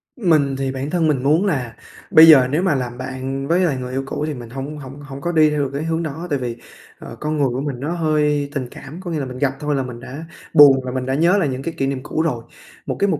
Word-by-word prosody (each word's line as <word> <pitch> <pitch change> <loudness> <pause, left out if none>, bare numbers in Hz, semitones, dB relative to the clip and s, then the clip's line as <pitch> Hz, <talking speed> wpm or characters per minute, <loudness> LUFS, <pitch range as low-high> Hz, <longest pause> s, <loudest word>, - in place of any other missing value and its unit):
Mình 155 - +2
thì 135 -1 -2
bản 135 +2 -4
thân 165 -1 +1
mình 140 -4 0
muốn 155 +8 +3
là 130 - -2 0.4
bây 160 - +9
giờ 135 -6 +8
nếu 155 +4 +1
mà 180 -6 +2
làm 120 -2 -3
bạn 130 +1 -4
với 170 +4 +2
lại 170 -7 +1
người 125 0 -5
yêu 135 +1 -2
cũ 145 +2 -3
thì 155 - -2
mình 120 -4 -9
hổng 135 +5 -6
hổng 140 0 -10
hổng 140 -1 -9
có 170 - -1
đi 155 -2 +4
theo 150 -1 0
được 140 - -2
cái 140 +2 -3
hướng 165 +1 -1
đó, 160 +3 -5
tại 145 -3 0
vì, 120 -2 -4 0.4
ờ, - - -9
con 155 0 -2
người 140 -2 +2
của 125 +2 -3
mình 140 -4 -4
nó 145 +5 -3
hơi 150 -4 +1
tình 130 -3 -2
cảm, 145 +6 -10
có 180 -2 -6
nghĩa 160 - -1
là 140 - -2
mình 125 -1 -7
gặp 135 0 0
thôi 150 -1 -1
là 135 - 0
mình 125 -2 -8
đã 135 +6 -8 0.3
buồn 140 -2 +8
rồi, 125 0 -5
mình 130 -1 -2
đã 130 - -1
nhớ 170 +6 +3
lại 170 -8 +1
những 130 0 -4
cái 165 - -4
kỷ 135 - 0
niệm 135 -1 -2
cũ 155 - -2
rồi. 135 -8 -1 0.4
Một - - -3
cái 200 - +3
mục 165 -7 0
140 Hz, 295 wpm, -20 LUFS, 130-155 Hz, 0.4 s, bây